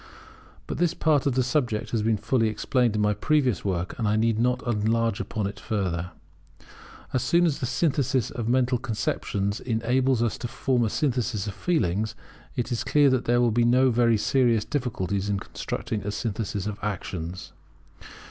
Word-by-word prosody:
But - - -5
this 175 -2 +2
part 150 -3 +2
of 135 - +1
the 130 - +3
subject 125 -4 -1
has 115 - 0
been 110 0 +1
fully 115 +2 +1
explained 110 +2 +1
in 105 - +1
my 105 0 +3
previous 130 - +1
work, 90 -2 -2
and 110 - 0
I 105 - +2
need 110 0 +2
not 125 +1 +1
enlarge 115 -1 +1
upon 105 -2 -3
it 100 - -5
further. 90 -6 -2 1.0
As 130 - +1
soon 170 +6 +3
as 155 -5 0
the 125 - -2
synthesis 130 -2 0
of 115 -2 -3
mental 125 0 +2
conceptions 105 -3 -2
enables 125 +1 +1
us 115 - -1
to 120 - -3
form 125 0 0
a - - 0
synthesis 125 -6 -1
of 100 - -4
feelings, 110 - 0 0.4
it 120 +1 -2
is 120 - -1
clear 145 -2 +4
that 130 -2 +1
there 120 +1 +3
will 120 -1 +3
be 120 +2 +2
no 125 +2 +4
very 115 -1 +3
serious 115 -1 +2
difficulties 100 - -2
in 100 - +1
constructing 105 +2 -4
a 100 - -4
synthesis 105 -2 -3
of 105 0 -4
actions. 90 -3 -5
115 Hz, 180 wpm, -26 LUFS, 105-125 Hz, 1.0 s, clear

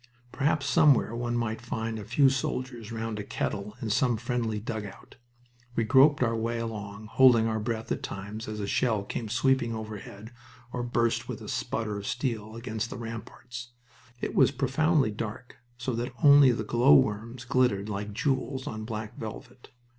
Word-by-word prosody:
Perhaps 145 +1 +1
somewhere 135 -4 +4
one 120 0 -1
might 110 -1 -2
find 110 -1 -3
a - - -6
few 120 +7 +4
soldiers 125 -3 -2
round 115 -1 -3
a - - -3
kettle 105 +1 -4
in 110 - -1
some 120 0 +2
friendly 115 -2 -2
dugout. 105 -1 -7 0.6
We 115 - +2
groped 135 +4 +5
our 115 -1 +1
way 115 +1 -1
along, 110 -2 -5
holding 115 0 +5
our 110 -1 0
breath 110 0 -3
at - - -1
times 105 +3 -6
as 110 0 -5
a 100 - -2
shell 110 0 +1
came 110 +2 -5
sweeping 125 0 +2
overhead 110 0 -8 0.4
or 125 - -2
burst 120 -1 0
with - - -4
a - - -9
sputter 105 -2 -2
of 100 - -7
steel 110 -4 -3
against 115 -1 -4
the - - -6
ramparts. 120 +1 -8 0.5
It - - -3
was - - +5
profoundly 140 0 +2
dark, 115 +3 -6 0.2
so 120 +2 -3
that 120 +2 -3
only 140 -2 +8
the 120 - -2
glowworms 115 - +3
glittered 125 -6 +2
like 105 0 -4
jewels 130 +3 -1
on 110 -6 -5
black 110 -1 -6
velvet. 120 +3 -9
115 Hz, 170 wpm, -28 LUFS, 110-125 Hz, 0.6 s, only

